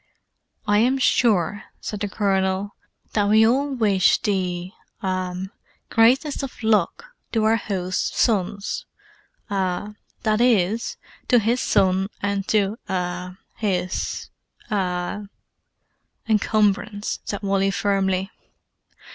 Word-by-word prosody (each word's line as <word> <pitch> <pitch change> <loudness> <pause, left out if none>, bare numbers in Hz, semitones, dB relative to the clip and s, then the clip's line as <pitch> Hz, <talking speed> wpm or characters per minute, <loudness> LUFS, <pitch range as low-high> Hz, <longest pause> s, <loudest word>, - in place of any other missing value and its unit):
"I 205 0 +3
am 255 +4 +3
sure," 210 -7 +2
said 210 - -5
the 205 - -1
Colonel, 195 -1 0 0.4
"that 205 -1 +2
we 220 +1 +6
all 270 +5 +2
wish 205 -6 +3
the—ah—greatest 190 - -1
of 270 -3 -7
luck 215 - +2 0.3
to 225 -2 +1
our 220 +1 +4
host's 185 -4 -2
sons—ah, 205 - -2 0.3
that 215 -1 +2
is, 225 -2 +2 0.3
to 245 - +5
his 235 +3 +2
son 190 0 +2
and 200 -1 -2
to—ah—his—ah——" 185 0 -3 1.0
"Encumbrance," 210 -1 +1
said 205 0 -5
Wally 195 0 +2
firmly. 195 -1 0
205 Hz, 90 wpm, -23 LUFS, 190-220 Hz, 1.0 s, we